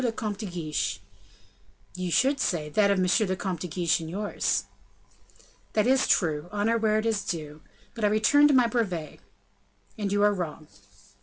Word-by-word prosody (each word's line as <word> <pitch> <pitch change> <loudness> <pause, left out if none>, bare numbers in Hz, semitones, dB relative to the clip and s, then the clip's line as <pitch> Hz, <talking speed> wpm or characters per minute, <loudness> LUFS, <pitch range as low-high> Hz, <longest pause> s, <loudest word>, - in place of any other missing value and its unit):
le 240 - +1
Comte 215 -3 -4
de 215 - -4
Guiche." 165 -4 -3 0.9
"You 185 -1 -4
should 270 - +2
say, 155 -5 -1
that 200 +6 +3
of 200 - +2
M. 185 +4 +2
le 185 - -1
Comte 185 -2 -4
de 180 - -5
Guiche 170 0 0
and 160 -1 -7
yours." 205 +4 -1 1.1
"That 215 - +2
is 265 +1 +3
true; 160 -2 +1
honor 215 +3 +1
where 215 -1 +2
it 215 - -1
is 220 -3 0
due; 155 -3 -5 0.3
but 230 - -7
I - - +5
return 220 +8 +4
to 295 - +3
my 250 -2 +5
brevet." 195 -10 -2 0.8
"And 200 -2 -2
you 205 0 +2
are 210 0 +4
wrong." 160 -5 -5
200 Hz, 180 wpm, -26 LUFS, 175-220 Hz, 1.1 s, I